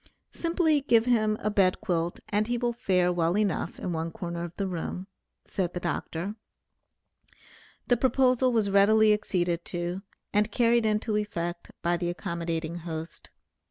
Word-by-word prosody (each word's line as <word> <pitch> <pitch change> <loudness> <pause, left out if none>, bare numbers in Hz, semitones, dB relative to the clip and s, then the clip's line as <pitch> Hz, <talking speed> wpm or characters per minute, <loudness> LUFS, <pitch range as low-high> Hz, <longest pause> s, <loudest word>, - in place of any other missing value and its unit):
"Simply 330 -3 +1
give 230 -5 +3
him 215 -3 +2
a 210 - 0
bed 190 -3 +3
quilt 170 -1 -2
and 210 +1 +1
he 240 0 0
will 240 0 0
fare 180 -5 +1
well 170 +2 +1
enough 200 -5 -1
in 180 - -3
one 165 0 -2
corner 170 0 -5
of 175 0 -7
the 200 - -2
room," 180 0 -4 0.4
said 180 -2 -2
the - - -1
Dr. 175 +2 -3 1.5
The 245 - +3
proposal 255 0 +3
was 215 -4 +1
readily 215 +2 +5
acceded 175 -4 -1
to, 175 +1 -3 0.3
and 210 +1 +2
carried 235 0 +3
into 215 0 0
effect 175 -5 -3
by 175 +1 +2
the 175 0 -2
accommodating 170 -2 -3
host. 165 -1 -7
195 Hz, 155 wpm, -28 LUFS, 175-220 Hz, 1.5 s, readily